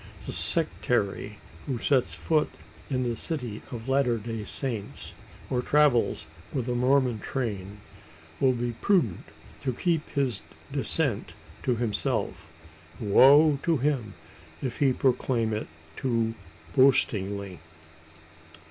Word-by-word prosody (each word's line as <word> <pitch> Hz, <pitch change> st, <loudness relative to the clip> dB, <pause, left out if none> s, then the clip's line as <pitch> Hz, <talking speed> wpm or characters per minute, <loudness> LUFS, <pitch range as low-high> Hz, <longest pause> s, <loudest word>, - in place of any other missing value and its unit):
The -, -, -4 dB
"Sectary" -, -, 0 dB, 0.3 s
who 130 Hz, -3 st, -1 dB
sets 130 Hz, +1 st, +1 dB
foot 155 Hz, -2 st, +1 dB, 0.4 s
in 130 Hz, -2 st, 0 dB
the 120 Hz, -1 st, -1 dB
city 125 Hz, -7 st, -3 dB
of 115 Hz, 0 st, -6 dB
Latter 135 Hz, -3 st, +2 dB
day 115 Hz, 0 st, -5 dB
Saints, 115 Hz, -2 st, -4 dB, 0.3 s
or 125 Hz, -1 st, 0 dB
travels 125 Hz, -, +3 dB, 0.3 s
with 130 Hz, -3 st, -2 dB
a 125 Hz, -, 0 dB
Mormon 125 Hz, -1 st, +2 dB
train, 105 Hz, -6 st, -4 dB, 0.6 s
will 130 Hz, -2 st, +4 dB
be 120 Hz, 0 st, -2 dB
prudent 120 Hz, -, +1 dB, 0.4 s
to 130 Hz, -, -1 dB
keep 165 Hz, +3 st, 0 dB
his 135 Hz, -4 st, 0 dB, 0.3 s
dissent -, -, +1 dB, 0.3 s
to 125 Hz, -, +1 dB
himself. 110 Hz, -7 st, -1 dB, 0.5 s
Woe 140 Hz, +7 st, +6 dB
to 165 Hz, -2 st, +2 dB
him 130 Hz, -7 st, -1 dB, 0.4 s
if 125 Hz, -3 st, -4 dB
he 140 Hz, -2 st, +4 dB
proclaim 125 Hz, -3 st, +1 dB
it 105 Hz, -, -3 dB, 0.3 s
too 115 Hz, -3 st, 0 dB, 0.4 s
boastingly! 100 Hz, -8 st, +2 dB
125 Hz, 115 wpm, -27 LUFS, 110-135 Hz, 0.6 s, Woe